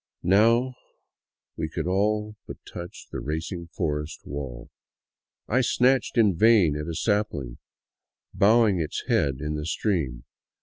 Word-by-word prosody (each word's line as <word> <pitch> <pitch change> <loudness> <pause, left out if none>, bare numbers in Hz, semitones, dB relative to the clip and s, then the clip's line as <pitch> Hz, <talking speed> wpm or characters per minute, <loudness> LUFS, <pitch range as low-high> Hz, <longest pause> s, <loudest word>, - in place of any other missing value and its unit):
Now 115 +7 +4 0.8
we - - -3
could - - -4
all 105 +3 0
but - - -7
touch 85 0 -9
the - - -4
racing 80 +4 -4
forest 75 -3 -4
wall. 70 -4 -7 0.8
I 125 +4 +2
snatched 130 +1 +2
in 105 -6 +4
vain 100 -6 +5
at 75 +1 -4
a 85 - -4
sapling 85 - -1 0.7
bowing 105 -2 +4
its 80 -2 -3
head 70 -2 +2
in 75 0 -2
the 75 0 -4
stream. 80 - -1
90 Hz, 130 wpm, -26 LUFS, 75-105 Hz, 0.8 s, vain